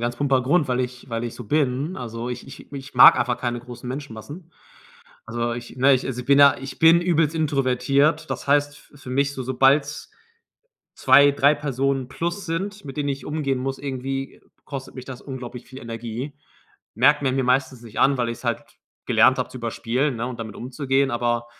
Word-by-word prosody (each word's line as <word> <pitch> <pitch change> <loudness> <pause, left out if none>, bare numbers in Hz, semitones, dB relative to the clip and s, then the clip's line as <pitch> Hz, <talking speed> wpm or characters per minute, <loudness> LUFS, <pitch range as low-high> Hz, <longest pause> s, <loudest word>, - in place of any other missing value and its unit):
ganz 120 0 -2
plumper 135 -1 +2
Grund, 150 +4 +2
weil 125 0 0
ich 125 0 -5
weil 115 +1 -2
ich 120 - -5
so 125 - -9
bin. 145 - 0
Also, 115 0 -5
ich 125 - -7
ich 135 - -13
ich 135 -1 -8
mag 125 - +9
einfach 125 -1 0
keine 120 -1 -3
großen 125 0 -10
Menschenmassen. 140 - -8 0.7
Also, 120 +1 -2
ich 120 +1 -8
ne, 135 +2 +5
ich 130 - -1
also, 125 -2 -4
ich 125 - -10
bin 140 0 +5
ja 140 -1 +7
ich 135 0 -8
bin 165 +1 +7
übelst 165 -3 +1
introvertiert, 140 +1 +1
das - - -4
heißt 145 +1 0
f 145 - -17
für 130 - -9
mich 140 +2 +1
so 130 - -5
sobald's 135 +3 +1 0.8
2, 145 0 +6
3 140 +1 +3
Personen 135 -2 -1
plus 175 +7 -4
sind, 195 +3 -4
mit 135 0 -8
denen 145 -1 -1
ich 140 0 -5
umgehen 145 -3 -1
muss, 135 +1 -3
irgendwie 135 0 -5 0.2
kostet 135 -2 -7
mich 130 - -8
das 130 -1 -9
unglaublich 125 -2 -8
viel 130 +1 -11
Energie. 115 +3 -6 0.6
Merkt 145 +6 +4
man 130 -2 +1
mir 135 - +1
meistens 130 0 0
nicht 115 -3 -6
an, 140 0 +4
weil 120 -2 -1
ich's 115 - -8
halt - - -1 0.4
gelernt - - +4
habe, - - -1
zu - - -8
überspielen, 130 +3 -1
ne, 115 +1 -3
und 125 -2 -6
damit 110 -2 -7
umzugehen, 135 +2 0
aber 120 -1 -1
135 Hz, 200 wpm, -23 LUFS, 125-145 Hz, 0.8 s, mag